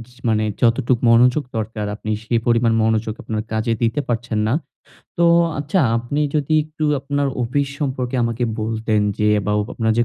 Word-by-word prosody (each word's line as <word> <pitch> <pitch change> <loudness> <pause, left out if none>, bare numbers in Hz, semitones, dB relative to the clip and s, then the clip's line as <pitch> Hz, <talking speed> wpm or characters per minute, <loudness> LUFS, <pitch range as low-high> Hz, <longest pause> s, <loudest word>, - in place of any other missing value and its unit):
য - - -22
মানে 110 -1 +2 0.2
যতটুকু 120 +1 +2
মনোযোগ 125 +5 +4
দরকার 110 -1 -3
আপনি 110 0 -5
সেই 115 +1 0
পরিমাণ 115 -1 +3
মনোযোগ 110 0 0
আপনার 110 -1 -3
কাজে 110 +1 0
দিতে 115 +5 +1
পারছেন 120 -2 -2
না। 115 - +1 0.7
তো, 170 - +4 0.3
আচ্ছা 145 +6 0 0.2
আপনি 120 +5 -3
যদি 150 0 0
একটু 155 0 -5 0.2
আপনার 145 +1 -1 0.2
অফিস 140 +4 0
সম্পর্কে 130 -3 -2
আমাকে 115 +1 -1 0.2
বলতেন 110 0 0 0.2
যে 105 - +2 0.2
বা 105 - +1 0.2
আপনার 110 -1 +1
যে 120 - +4
115 Hz, 165 wpm, -20 LUFS, 110-135 Hz, 0.7 s, মনোযোগ